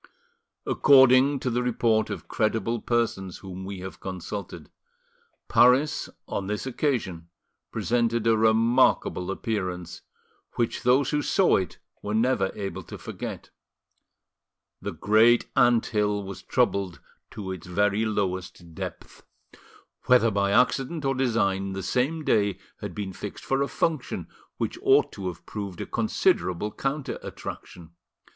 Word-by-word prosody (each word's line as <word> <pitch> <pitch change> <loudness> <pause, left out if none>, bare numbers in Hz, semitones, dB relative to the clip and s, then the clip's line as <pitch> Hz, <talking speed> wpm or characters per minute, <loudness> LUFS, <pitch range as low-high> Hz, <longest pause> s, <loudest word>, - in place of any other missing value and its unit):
According 135 0 +5
to 125 - -1
the 120 +1 0
report 115 -2 +1
of - - -6
credible 110 +1 0
persons 110 -6 -1
whom 95 -1 -8
we 95 -1 -6
have 95 +1 -8
consulted, 95 +2 -7 0.8
Paris 130 +5 +4 0.2
on 95 - -3
this 105 +4 -3
occasion 115 - -2 0.4
presented 115 -1 0
a 115 -1 +4
remarkable 110 -4 +3
appearance, 95 -4 -3 0.5
which 120 -1 -1
those 125 +2 +3
who 150 - +1
saw 190 +5 +3
it 95 - -4 0.2
were 105 +1 -3
never 110 -4 +2
able 100 -1 -4
to - - -9
forget. - - -7 1.3
The - - -4
great 110 +3 +4
anthill 105 -5 +2
was 95 0 -8
troubled 100 -8 0 0.3
to 95 -3 -6
its 90 -2 -7
very 105 +4 +1
lowest 95 -5 -3
depth. - - -8 0.9
Whether 120 -3 +5
by 100 -1 +1
accident 135 +7 +1
or 135 - +2
design, 100 -7 0
the 95 0 -4
same 140 - 0
day 100 -7 +2 0.2
had - - -6
been 100 -2 -4
fixed - - -8
for 135 +1 +1
a 140 - +1
function 155 -4 -2 0.3
which - - -3
ought 405 +1 +4
to 95 -3 -6
have 85 -1 -7
proved 100 -4 -6
a - - -3
considerable 90 +4 0
counter 135 +3 -3
attraction. 85 -3 -9
110 Hz, 130 wpm, -26 LUFS, 95-125 Hz, 1.3 s, According